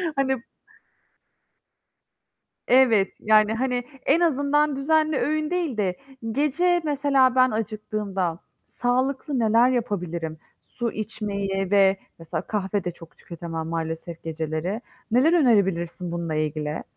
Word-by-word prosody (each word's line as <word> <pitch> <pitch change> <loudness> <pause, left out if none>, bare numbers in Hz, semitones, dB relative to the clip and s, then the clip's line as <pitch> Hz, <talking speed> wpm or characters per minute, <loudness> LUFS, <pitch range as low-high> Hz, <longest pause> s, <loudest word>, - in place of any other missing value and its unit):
Hani 265 -2 0 2.3
Evet, 240 -6 +4
yani, 215 0 +4
hani, 250 +1 -1 0.2
en 310 +5 +4
azından 295 -2 +2
düzenli 310 +2 +2
öğün 305 +2 0
değil 345 -8 -1
de 185 -4 0 0.4
gece 345 +7 +2
mesela 280 -3 +3
ben 255 0 +5
acıktığımda 210 -5 -3 0.3
sağlıklı 260 +3 -1
neler 230 +2 +4
yapabilirim? 175 -9 -2 0.3
Su 235 -2 -4
içmeyi 200 -3 -3
ve 195 -1 +5 0.2
mesela 165 -1 -4
kahve 200 -2 -2
de 175 - -1
çok 165 -1 -15
tüketemem 165 -1 -6
maalesef 165 0 -4
geceleri. 160 +5 -3 0.3
Neler 255 +8 +4
önerebilirsin 180 - +1
bununla 170 -2 -3
ilgili? 155 0 -2
215 Hz, 110 wpm, -24 LUFS, 175-265 Hz, 2.3 s, ben